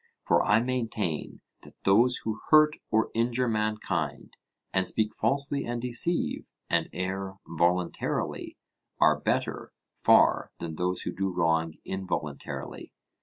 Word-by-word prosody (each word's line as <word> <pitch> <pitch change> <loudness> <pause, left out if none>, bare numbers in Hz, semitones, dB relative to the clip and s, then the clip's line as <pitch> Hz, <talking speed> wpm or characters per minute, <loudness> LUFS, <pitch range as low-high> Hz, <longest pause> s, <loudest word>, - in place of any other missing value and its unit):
For 85 0 +4
I 105 +2 +4
maintain 115 -9 -2 0.2
that - - -15
those 115 +6 +4
who 110 -1 -3
hurt 155 -1 +6
or 110 +1 +1
injure 120 +2 +1
mankind, 110 -1 -2 0.4
and 95 -1 +2
speak 110 -1 0
falsely 140 +4 0
and 120 0 -3
deceive, 125 +8 +1 0.2
and - - +1
err 95 +1 -4
voluntarily, 85 +2 -1 0.4
are - - +4
better - - -2 0.2
far - - +4
than 85 -1 -5
those 90 +3 -1
who - - -3
do 95 0 -2
wrong 80 -2 +1
involuntarily. 95 -1 -5
105 Hz, 125 wpm, -28 LUFS, 90-120 Hz, 0.4 s, hurt